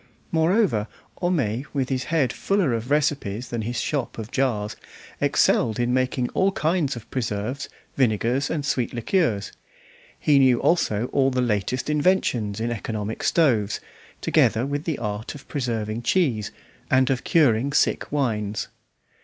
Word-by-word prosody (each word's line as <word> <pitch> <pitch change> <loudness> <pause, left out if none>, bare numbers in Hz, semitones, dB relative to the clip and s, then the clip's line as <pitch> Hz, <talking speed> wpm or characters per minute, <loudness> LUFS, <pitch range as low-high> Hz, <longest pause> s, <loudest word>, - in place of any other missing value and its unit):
Moreover, 160 - +2 0.3
Homais, 135 - 0
with 135 -3 -1
his 130 -1 -1
head 150 -7 +1
fuller 195 -10 +1
of 115 +2 -3
recipes 135 -6 0
than 120 -2 -2
his 120 +2 -3
shop 140 0 -2
of 110 +1 -6
jars, 110 -6 0 0.5
excelled 110 0 +2
in 120 0 +1
making 130 -1 0
all 195 +1 +2
kinds 160 -7 0
of 115 -1 -9
preserves, 120 +2 -3 0.3
vinegars, 125 +2 +1
and 145 -3 -2
sweet 125 -4 -1
liqueurs; 115 - 0 0.7
he 145 -2 +4
knew 130 -3 +5
also 115 -10 +1
all 135 -1 +3
the 130 -1 -1
latest 120 +1 0
inventions 145 - +1
in 115 +1 -1
economic 110 -1 -4
stoves, 120 -12 +2 0.4
together 115 +4 +3
with 145 +2 -3
the 160 -4 -1
art 105 +3 -4
of 140 - -12
preserving 115 -4 -2
cheese 120 - +1 0.4
and 130 0 +3
of 130 - -1
curing 140 -4 +3
sick 145 - +1
wines. 110 -7 -1
125 Hz, 145 wpm, -24 LUFS, 110-145 Hz, 0.7 s, knew